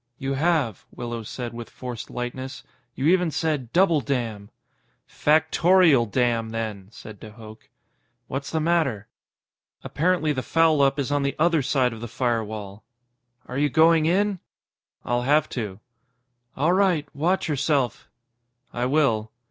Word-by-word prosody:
"You 135 +1 -3
have," 145 - 0
Willows 120 -2 -6
said 120 -2 -5
with 115 0 -8
forced 125 -3 -7
lightness. 125 +2 -6 0.3
"You 135 - -3
even 180 +1 +3
said 150 -6 -2
'double 170 -4 +3
damn'." 115 -7 -3 0.6
"Factorial 160 -3 +3
damn, 120 -2 0
then!" 110 -4 -5
said 110 -3 -11
de 110 - -10
Hooch. 110 -1 -13 0.6
"What's 135 +3 -5
the 160 - -1
matter?" 155 -10 0 0.7
"Apparently 160 -1 0
the 130 - -2
foul 160 0 +3
up 135 0 +3
is 140 -1 -2
on 145 0 +1
the 140 0 -1
other 165 -1 +3
side 130 -2 +1
of 110 - -10
the 120 - -5
firewall." 110 -4 -3 0.6
"Are 130 +2 -4
you 145 0 +2
going 160 +2 +4
in?" 195 +2 +1 0.7
"I'll 120 0 0
have 145 +4 +2
to." 105 -5 -5 0.8
"All 155 +6 +2
right. 185 -6 +2
Watch 170 +7 0
yourself." 140 -4 -1 0.6
"I 120 +1 -1
will." 120 -7 +1
135 Hz, 140 wpm, -24 LUFS, 115-160 Hz, 0.8 s, going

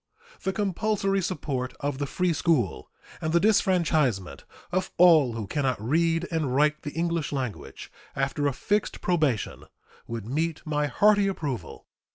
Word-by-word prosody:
The 190 - -1
compulsory 195 0 0
support 140 -8 -3
of 145 -1 -3
the 145 - -1
free 180 +4 0
school 150 - 0 0.3
and 160 0 -1
the 170 - +5
disfranchisement 155 - +1 0.3
of 185 +1 -1
all 160 -8 +6
who 115 -2 -4
can 145 +9 -2
not 130 -5 0
read 165 - +1
and 155 -6 -1
write 150 +2 +2
the 145 - -6
English 170 -1 -1
language, 130 -7 -5 0.2
after 140 +1 0
a - - +2
fixed 205 +10 -1
probation, 155 - 0 0.4
would 115 -3 -5
meet 160 +7 -2
my 150 -1 0
hearty 205 +7 +4
approval. 140 - -4
155 Hz, 150 wpm, -26 LUFS, 130-180 Hz, 0.4 s, all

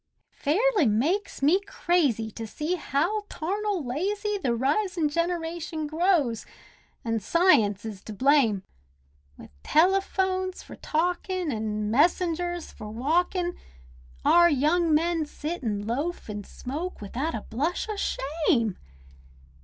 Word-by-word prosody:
It - - -36
fairly 395 - +2
makes 285 - 0
me 325 +7 +5
crazy 300 - 0
to 225 +1 -6
see 305 +9 -3
how 360 +6 -1
tarnal 395 0 -2
lazy 405 - -1
The 245 -9 0
risin' 315 - +1
generation 335 -1 -2
grows—an' 295 - -2
science 215 - +3
is 210 -4 -6
to - - -7
blame. 245 -5 +3 0.7
With - - -13
telephones 375 - +1
for - - -11
talkin', 355 +1 -1
an' 215 -2 -2
messengers 345 +4 +1
for 215 -2 -9
walkin', 345 - 0 0.7
Our 345 0 +6
young 320 +4 +2
men 325 0 +2
sit 310 +2 -5
an' 205 -3 -2
loaf 285 +10 -3
an' 205 -1 -6
smoke, 310 +9 -6
without 260 +10 -3
a 220 - -4
blush 305 - -2
o' 430 - -3
shame. 280 - 0
315 Hz, 120 wpm, -26 LUFS, 240-355 Hz, 0.7 s, Our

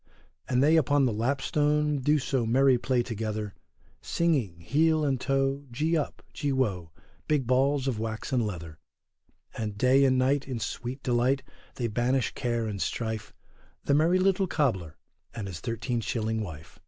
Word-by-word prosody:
And 125 +1 +3
they 155 +3 +5
upon 145 -3 +3
the 120 - +1
lapstone 145 +5 +1
do 150 +4 +3
so 130 -2 0
merry 130 +2 +4
play 125 -1 +1
together, 110 -3 -4 0.5
Singing, 135 - 0
heel 155 - +2
and 135 -3 0
toe, 135 +1 0
gee 155 +7 0
up, 155 - -2
gee 145 - -1
woe, 100 -11 -1 0.4
big 150 -4 +1
balls 135 +2 +2
of 120 -5 -1
wax 110 +4 -4
and 125 -2 +2
leather. 85 -6 -6 0.8
And 105 -2 -4
day 130 +4 +4
and 130 -1 +4
night 135 +2 +1
in 130 -3 -3
sweet 120 +5 -5
delight, 125 +2 +1 0.3
they 120 - -2
banish 120 +3 0
care 120 -2 -1
and 105 -3 -4
strife, 110 -2 -3 0.5
the 140 - +1
merry 160 +5 +4
little 190 0 +2
cobler 95 - -1 0.4
and 110 - -4
his 90 -4 -6
thirteen 115 +4 -2
shilling 110 0 -1
wife. 80 -6 -9
125 Hz, 160 wpm, -28 LUFS, 110-140 Hz, 0.8 s, they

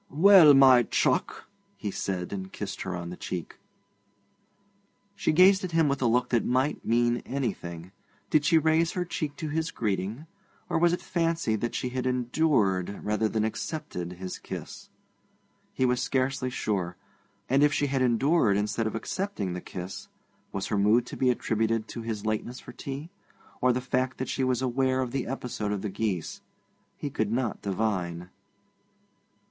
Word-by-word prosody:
'Well, 165 -2 +8
my 130 -2 +8
chuck!' - - 0 0.3
he 105 - -4
said, 95 -1 -3
and 95 -1 -5
kissed 100 -2 -6
her 95 -1 -3
on 85 -1 -5
the - - -6
cheek. 90 -2 -6 1.6
She - - +1
gazed 185 +4 +6
at 180 -3 -4
him 165 -2 +4
with 140 -1 -1
a 125 - +3
look 125 +2 +2
that 120 -2 +2
might 130 +4 0
mean 120 +1 +2
anything. 95 -10 -4 0.4
Did 150 - +4
she 165 +2 +4
raise 160 +1 +2
her 180 -1 -1
cheek 155 -4 -4
to 155 0 -5
his 160 +2 -1
greeting, 105 +5 -2 0.4
or 170 -2 0
was 170 0 +4
it 175 - -2
fancy 165 -9 0
that 120 +3 -3
she 125 - -2
had 130 0 -2
endured, 120 - +1
rather 105 +1 +1
than 110 -1 0
accepted, 110 - -4
his 90 +1 -7
kiss? - - -8 0.8
He 130 - 0
was 125 0 +1
scarcely 130 -1 0
sure. 95 -8 -2 0.5
And 135 +2 +3
if 150 0 +5
she 145 0 +1
had 135 -1 0
endured 125 -2 +3
instead 105 +2 -1
of 110 - -4
accepting 115 - -3
the 90 - -5
kiss, 90 +1 -7 0.4
was 100 - -3
her 105 - +1
mood 110 +4 +4
to - - -8
be 130 - +2
attributed 115 -2 0
to 120 - -6
his 110 -2 -4
lateness 110 +3 -2
for - - -11
tea, 140 +5 -7 0.5
or 125 - +4
to - - +4
the 125 - -1
fact 130 0 0
that 130 - -4
she 135 - -1
was 130 0 +1
aware 130 +1 +1
of 125 -2 -3
the 135 -1 -2
episode 120 -5 -3
of 105 -2 -3
the 105 - -2
geese? 95 -4 -3 0.6
He 145 - -4
could 110 -6 -1
not 120 -2 -1
divine. 90 -4 -2
120 Hz, 175 wpm, -27 LUFS, 105-140 Hz, 1.6 s, Well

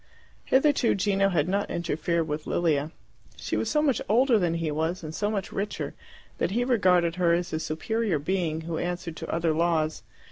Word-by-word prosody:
Hitherto 270 -2 +3
Gino 195 0 +2
had 165 -4 +1
not 200 +2 0
interfered 170 0 -1
with 150 0 -4
Lilia. 155 -4 +1 0.5
She - - -4
was - - -1
so 300 0 +2
much 275 -6 +2
older 240 +1 +4
than 170 -3 +1
he 165 -2 -1
was, 160 +4 -2
and 155 0 -6
so 205 +5 -1
much 205 -3 -3
richer, 200 +2 -3 0.5
that - - +1
he 235 +5 0
regarded 180 -8 +3
her 175 -2 +3
as 175 0 -1
a 155 - 0
superior 185 +5 -1
being 160 0 -1
who 160 0 -4
answered 175 -2 -3
to - - -7
other 165 -1 +1
laws. 160 -2 +1
175 Hz, 185 wpm, -27 LUFS, 160-200 Hz, 0.5 s, older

